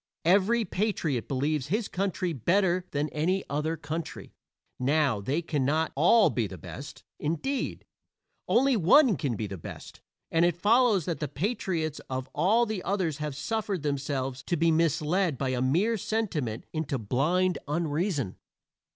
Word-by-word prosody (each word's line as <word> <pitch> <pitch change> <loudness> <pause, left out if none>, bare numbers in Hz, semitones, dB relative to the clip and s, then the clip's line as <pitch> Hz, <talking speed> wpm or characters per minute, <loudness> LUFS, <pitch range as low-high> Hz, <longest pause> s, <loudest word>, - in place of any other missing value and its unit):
Every 205 +6 +4
patriot 175 - -1
believes 140 +1 -1
his 210 +7 0
country 185 -2 -2
better 180 - +1
than 145 +1 -1
any 175 +7 0
other 155 +3 -1
country. 160 +2 -6 0.5
Now, 135 -4 +2
they 145 +11 -1
cannot 155 +1 0
all 195 +9 +5
be 115 -4 0
the 95 - -9
best; - - -9 0.2
indeed, 170 - -2 0.6
only 265 +2 +4
one 225 - +5
can 140 -7 -2
be 110 - -3
the 95 -3 -6
best, - - -10 0.3
and 165 +1 +3
it 175 0 +3
follows 210 - +3
that 170 - -2
the 150 - -2
patriots 160 - -2
of 130 0 -3
all 200 +10 +3
the 215 -4 -3
others 185 -7 -1
have 150 -2 -3
suffered 200 +2 -2
themselves 135 -2 -2
to 175 - 0
be 165 +1 +3
misled 165 0 +1
by 135 0 -1
a 125 -1 -1
mere 180 - +2
sentiment 160 - -2
into 155 -4 -2
blind 155 - +1
unreason. 150 - -1
160 Hz, 150 wpm, -28 LUFS, 140-190 Hz, 0.6 s, all